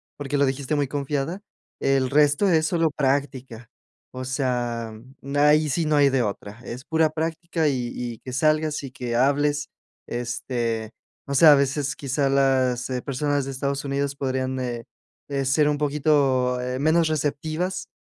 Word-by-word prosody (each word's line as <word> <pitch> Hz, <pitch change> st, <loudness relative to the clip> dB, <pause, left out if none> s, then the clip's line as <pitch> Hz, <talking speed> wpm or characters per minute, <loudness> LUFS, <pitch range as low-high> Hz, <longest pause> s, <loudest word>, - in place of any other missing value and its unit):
porque 145 Hz, 0 st, -3 dB
lo 140 Hz, -, +4 dB
dijiste 135 Hz, +2 st, -1 dB
muy 145 Hz, -2 st, 0 dB
confiada, 145 Hz, +6 st, -3 dB, 0.4 s
el 135 Hz, -2 st, +2 dB
resto 150 Hz, +6 st, +3 dB
es 160 Hz, -4 st, +3 dB
solo 165 Hz, -3 st, +1 dB
práctica. 135 Hz, -4 st, -2 dB, 0.4 s
O 130 Hz, 0 st, -6 dB
sea, 120 Hz, -4 st, -2 dB, 0.5 s
ahí 155 Hz, +1 st, +4 dB
sí 165 Hz, +4 st, 0 dB
no 150 Hz, -1 st, +2 dB
hay 145 Hz, -1 st, +6 dB
de 130 Hz, -2 st, +1 dB
otra. 105 Hz, +1 st, -5 dB
Es 125 Hz, +2 st, -8 dB
pura 160 Hz, -1 st, +2 dB
práctica, 165 Hz, +1 st, -2 dB
y 125 Hz, -4 st, -1 dB
y 120 Hz, -2 st, -5 dB
que 130 Hz, -, -8 dB
salgas, 155 Hz, +2 st, +1 dB
y 135 Hz, -, -7 dB
que 125 Hz, -2 st, -3 dB
hables. 145 Hz, +3 st, +2 dB, 0.4 s
Este, 120 Hz, -2 st, -3 dB, 0.3 s
o 140 Hz, -, -4 dB
sea, 155 Hz, +3 st, +8 dB
a -, -, +8 dB
veces, 140 Hz, 0 st, 0 dB
quizá 140 Hz, 0 st, 0 dB
las 130 Hz, -2 st, +2 dB, 0.2 s
personas 145 Hz, +1 st, 0 dB
de 135 Hz, -, -5 dB
Estados 140 Hz, +1 st, -2 dB
Unidos, 140 Hz, 0 st, -2 dB
podrían, 130 Hz, -1 st, -2 dB
eh, 120 Hz, -2 st, -4 dB, 0.6 s
ser 145 Hz, +3 st, +2 dB
un 150 Hz, -1 st, +1 dB
poquito, 140 Hz, -4 st, +1 dB
eh, 125 Hz, +1 st, -3 dB
menos 160 Hz, +2 st, +3 dB
receptivas, 155 Hz, +4 st, -2 dB
140 Hz, 155 wpm, -24 LUFS, 130-150 Hz, 0.6 s, sea